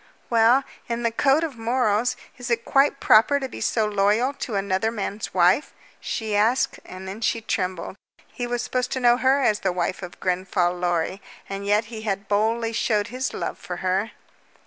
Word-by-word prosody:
"Well, 235 +4 +5 0.3
in 235 0 -2
the 230 - +1
code 275 +6 +3
of 285 -8 -4
morals, 235 0 +1 0.2
is 245 0 -7
it 230 -1 0
quite 275 0 +3
proper 230 +7 +5
to 270 - -3
be - - -9
so 220 -2 +1
loyal 210 +6 +2
to 240 -5 -5
another 195 +2 0
man's 210 -1 -4
wife?" 180 +9 +3 0.2
she 220 -2 -3
asked, 225 +5 +2
and 185 +1 -9
then 200 +4 -7
she 230 - +1
trembled. 185 -5 -3 0.4
He 245 - -3
was 245 0 -2
supposed 250 0 -2
to 260 - -1
know 240 -1 +5
her 265 +2 +3
as 210 -4 +2
the 190 - 0
wife 180 +1 -2
of 180 -1 -9
Grenfall 180 -1 0
Lorry, 175 +1 -1 0.3
and 195 0 -5
yet 210 +2 +3
he 220 - -6
had 200 -2 -3
boldly 225 +3 +1
shown 215 -2 +1
his 255 +2 -3
love - - -4
for 180 - -6
her. 190 +4 0
220 Hz, 190 wpm, -24 LUFS, 195-245 Hz, 0.4 s, Well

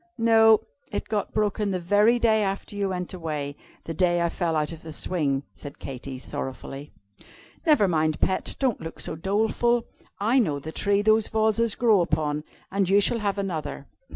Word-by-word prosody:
"No 225 -1 +5 0.3
it 205 - -3
got 210 -2 -1
broken 210 -1 0
the 185 -2 -1
very 205 +7 +4
day 220 -2 +3
after 195 0 -3
you 200 -1 -1
went 180 -1 -4
away; 150 -5 -4 0.3
the 165 - -4
day 175 +1 +2
I 170 0 +1
fell 165 -2 -1
out 150 0 0
of 165 -1 -9
the 160 - -9
swing," 145 -4 -1
said 145 - -10
Katy, 135 0 -7
sorrowfully. 135 +2 -6 0.8
"Never 295 -10 +5
mind, 155 -3 +1
pet, 190 - 0
don't 260 -5 0
look 165 - -7
so - - -2
doleful. 220 +6 +1 0.3
I 230 +6 +3
know 155 - +1
the 155 +3 -7
tree 200 +4 +1
those 220 0 +4
vases 220 0 +2
grow 220 -6 +4
upon, 155 -3 -1 0.3
and 195 -1 +1
you 200 +1 +5
shall 230 +3 +2
have 205 -2 -1
another. 185 -6 -4
195 Hz, 180 wpm, -25 LUFS, 160-215 Hz, 0.8 s, No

